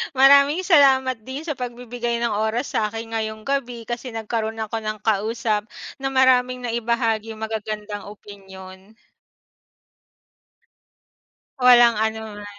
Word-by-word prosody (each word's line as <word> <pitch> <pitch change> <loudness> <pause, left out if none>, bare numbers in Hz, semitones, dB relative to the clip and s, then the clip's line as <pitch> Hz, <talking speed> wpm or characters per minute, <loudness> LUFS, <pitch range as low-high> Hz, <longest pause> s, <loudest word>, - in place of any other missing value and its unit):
Maraming 280 +5 +5
salamat 265 -7 +4
din 265 +4 -6
sa 300 -5 -4
pagbibigay 240 -1 -4
ng 235 - 0
oras 220 +5 -1
sa 215 - 0
akin 225 +1 -7
ngayong 220 -1 -4
gabi, 250 -3 -3
kasi 240 +1 -6
nagkaroon 225 0 -3
ako 220 +1 -3
ng 215 -1 -4
kausap, 215 0 -1 0.3
na 270 - -2
maraming 255 -1 +3
naibahaging 230 -2 -1
magagandang 215 -2 -5
opinyon. 195 -1 -13 2.7
Walang 240 -2 +7
anuman. 220 -2 -5
230 Hz, 110 wpm, -22 LUFS, 215-250 Hz, 2.7 s, Walang